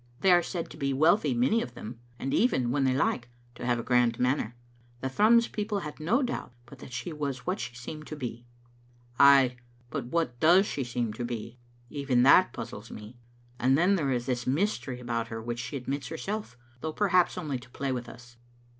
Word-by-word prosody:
They 190 - +5
are 175 0 +6
said 170 -1 -5
to 150 - -10
be 140 -2 -1
wealthy, 170 - +3
many 240 -2 +2
of 125 - -6
them, 115 0 -8 0.2
and 135 +2 -3
even, 130 - +2
when 135 0 +1
they 130 -1 +2
like, 125 -2 0 0.2
to 120 - -10
have 120 -1 +2
a 115 - -4
grand 120 -1 +2
manner. 125 -2 0 0.5
The 130 - -2
Thrums 225 - +4
peo 210 - -3
ple 210 -2 -1
had 150 -2 -7
no 225 - +2
doubt 245 - -4
but 125 +1 -14
that - - -11
she 160 +7 -5
was 140 -4 -4
what 185 +2 -1
she 125 -1 -5
seemed 155 +6 -8
to 155 - -6
be." 120 -3 -6 0.4
" 120 0 -30
Ay, 135 -3 +6 0.3
but 140 -5 -3
what 125 -5 -1
does 175 +7 +6
she 140 - -3
seem 120 -2 -2
to 120 - -5
be? 120 0 -5 0.3
Even 135 -4 +1
that 180 +7 +6
puz - - -6
zles 105 +2 -9
me. 110 +3 -10 0.4
And 130 +2 +3
then 180 +5 +4
there 155 -8 +1
is 120 -2 -1
this 125 -1 -2
mystery 140 -4 -1
about 120 -2 -2
her 115 0 -5
which 120 +1 -4
she 130 +4 -4
admits 135 +1 -4
herself, 165 - -5 0.2
though 160 +4 -4
perhaps 185 -3 +2
only 150 -7 -3
to 125 - -15
play 135 +2 -3
with 120 -2 -4
us." 120 0 -14
130 Hz, 215 wpm, -28 LUFS, 120-165 Hz, 0.5 s, are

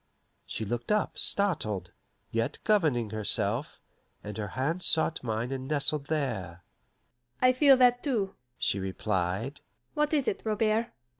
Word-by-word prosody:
She 110 - -3
looked 120 - -3
up, 210 -1 0
startled, 110 - +1 0.4
yet 115 0 -1
governing 150 - +2
herself, 110 +3 0 0.4
and 105 0 -6
her 105 0 -3
hand 160 +7 0
sought 165 -1 +1
mine 115 +1 -2
and 130 -1 -4
nestled 145 0 0
there. 95 - -3 0.8
"I 255 0 +5
feel 270 0 +6
that, 245 -1 +5
too," 220 -9 -1 0.2
she 100 - +2
replied. 95 +6 -2
130 Hz, 115 wpm, -29 LUFS, 105-175 Hz, 0.8 s, feel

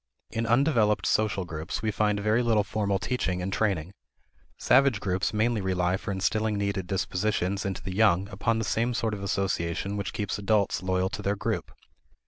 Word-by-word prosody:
In 115 0 -2
undeveloped 120 -4 +3
social 105 -3 +1
groups, 80 +4 -5
we 110 - +1
find 105 0 +1
very 110 +3 +2
little 115 -3 +3
formal 100 -1 -1
teaching 95 -4 -1
and 95 +2 -3
training. 95 -5 0 0.6
Savage 130 -3 +4
groups 95 -2 -1
mainly 110 0 +1
rely 90 -1 +1
for 100 - -4
instilling 105 +3 0
needed 100 -2 -2
dispositions 95 0 -1
into 95 -2 -3
the 95 - -4
young 100 -2 +3
upon 105 +3 0
the 110 - -1
same 115 +3 0
sort 110 -1 -1
of 100 - -5
association 95 -1 -1
which 100 -2 -3
keeps 105 0 -3
adults 100 -2 +1
loyal 95 0 0
to 105 +1 -5
their 100 0 0
group. - - -3
100 Hz, 175 wpm, -27 LUFS, 95-110 Hz, 0.6 s, Savage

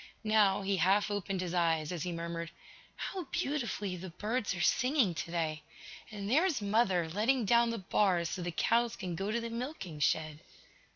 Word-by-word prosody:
Now, 210 -2 +3
he 195 0 0
half 200 +3 +3
opened 195 -2 -2
his 180 -1 -3
eyes, 165 -3 +1
as 175 -3 -4
he 180 - -2
murmured: 170 0 -4 0.5
"How 370 -3 -4
beautifully 235 -10 -2
the 180 +1 -7
birds 210 +4 -2
are - - -6
singing 250 - +2
today! 165 -2 -2 0.5
And 205 -2 -6
there's 310 - +3
mother, 200 -5 +2
letting 220 +8 +1
down 235 +2 +4
the 230 - -2
bars 185 -4 +1
so 185 - -4
the 175 - -2
cows 235 +7 +1
can 180 -3 -5
go 195 +4 -3
to 230 +2 0
the 230 0 -5
milking 230 - -5
shed!" 155 0 0
195 Hz, 175 wpm, -32 LUFS, 175-230 Hz, 0.5 s, down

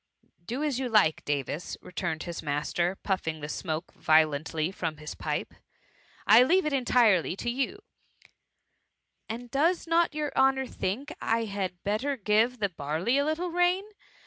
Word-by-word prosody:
^ - - -33
Do 255 +6 -2
as 285 -4 0
you 260 -2 -2
like, 205 -9 +3
Davis,^ 145 +3 -3
returned 175 -3 -4
his 170 -1 -5
mas 145 -1 -2
ter, 175 +2 +1
puffing 175 -6 -2
the 145 - -4
smoke 160 +1 -4
violently 155 +1 +2
from 165 -5 -4
his 150 0 -7
pipe, - - -3 0.4
'* - - -35 0.3
I - - +8
leave 355 +8 +4
it 305 - 0
entirely 235 - +3
to 240 - -2
you/' 265 +8 -1
^ 410 - -16 1.5
And 235 +2 -6
does 330 +6 +2
not 335 -2 +2
your 300 -1 -2
honour 265 0 +3
think 255 - -4
I 230 +1 +1
had 195 -4 -4
better 245 +8 -1
give 220 +3 +2
the 205 -3 0
barley 165 - -1
a 285 - +1
little 335 +3 -1
rain? 355 +2 +2
215 Hz, 170 wpm, -28 LUFS, 165-275 Hz, 1.5 s, I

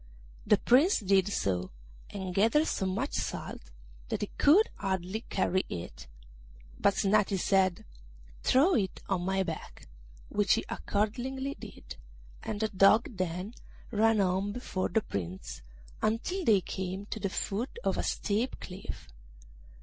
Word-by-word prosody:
The - - +6
Prince 285 - +4
did 195 -1 +3
so, 90 - -1 0.4
and 190 -3 -5
gathered 230 - +4
so 190 - -1
much 225 +10 -2
salt - - -3 0.5
that - - -2
he - - -3
could 365 +10 +6
hardly 190 +1 -2
carry 190 0 +1
it; 80 -6 -7 0.7
but 200 - +3
Snati 200 0 +2
said, 190 -1 +2 0.6
'Throw 295 +9 +4
it 195 -6 -1
on 190 -3 0
my 190 +1 +1
back,' 165 -3 -7 0.4
which 205 -1 +2
he - - -2
accordingly 255 +6 -2
did, - - -11 0.4
and 205 - -4
the 220 - +1
Dog 205 +4 +4
then 185 +3 -3 0.4
ran 225 0 +3
on 190 +2 +1
before 200 -6 -2
the 220 - +2
Prince, 95 - -5 0.4
until 335 - -1
they 205 -4 +5
came 190 +2 -4
to 215 - -5
the 200 - -1
foot 225 - -3
of - - +1
a - - 0
steep 220 +5 -1
cliff. 185 +1 -8
200 Hz, 140 wpm, -30 LUFS, 185-225 Hz, 0.7 s, The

